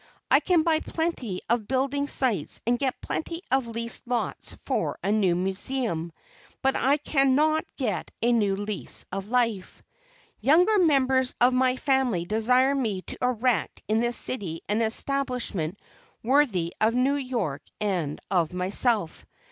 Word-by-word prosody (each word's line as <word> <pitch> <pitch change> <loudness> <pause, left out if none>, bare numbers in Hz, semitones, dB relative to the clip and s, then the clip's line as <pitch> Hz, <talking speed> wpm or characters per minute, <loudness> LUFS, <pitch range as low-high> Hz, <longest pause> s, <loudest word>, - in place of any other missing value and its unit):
I - - +7
can 350 -4 +2
buy 320 -1 +2
plenty 315 - -3
of 230 -3 0
building 275 +2 0
sites 235 - 0
and 240 +1 +1
get 265 -3 -1
plenty 335 +2 -4
of 265 -2 +2
leased 230 +1 -2
lots 245 -1 -3
for - - -1
a 200 - 0
new 195 -5 +2
museum; 190 -1 -2 0.5
but 270 0 +2
I 275 +3 +3
cannot 295 +2 +2
get 210 - -2
a 240 - +2
new 205 -5 +2
lease 205 +1 -3
of 195 +2 -5
life. 230 -6 -1 0.6
Younger 360 +9 +4
members 265 -6 +3
of 245 +1 +4
my 255 0 +2
family 260 -10 +1
desire 250 +7 +2
me 220 -9 -2
to - - -7
erect 250 -5 0
in 220 +1 +2
this 240 +1 +1
city 180 -10 -1
an 210 +3 0
establishment 230 - 0 0.5
worthy 225 - +2
of 220 +2 +3
New 260 +3 +2
York 235 - -3 0.2
and 180 -8 -2
of 175 -3 +1
myself. 195 +1 0
240 Hz, 145 wpm, -26 LUFS, 200-270 Hz, 0.6 s, I